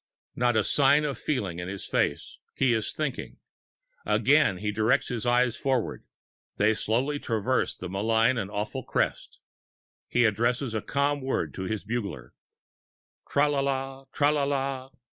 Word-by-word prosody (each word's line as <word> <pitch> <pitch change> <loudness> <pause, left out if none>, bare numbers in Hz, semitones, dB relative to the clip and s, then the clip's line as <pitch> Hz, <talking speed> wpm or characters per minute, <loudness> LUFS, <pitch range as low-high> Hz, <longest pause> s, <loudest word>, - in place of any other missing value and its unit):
Not 120 -1 +2
a 110 - +3
sign 145 +4 +4
of 140 -2 -3
feeling 100 - -2
in 90 - -5
his 95 +1 -6
face; 70 - -1 0.2
he 130 -2 +3
is 110 -2 -1
thinking. 150 -5 -4 0.7
Again 140 -5 +3
he 105 +2 -2
directs 110 +4 +1
his 120 -1 -3
eyes 120 -1 +3
forward; 130 -4 -1 0.5
they 105 +2 +4
slowly 125 +7 0
traverse 115 +2 0
that 90 - -7
malign 110 +6 +2
and 100 -3 -3
awful 105 0 -3
crest. - - -2 0.7
He 120 -1 +3
addresses 120 +3 +1
a 110 - -1
calm 140 +3 0
word 130 0 -2
to 95 - -5
his 105 +2 -3
bugler. 100 - -4 1.0
Tra 145 +1 +3
la 145 -1 0
la! 135 0 -2
Tra 145 -1 +3
la 150 -2 +1
la! 135 -1 -2
120 Hz, 155 wpm, -27 LUFS, 110-135 Hz, 1.0 s, sign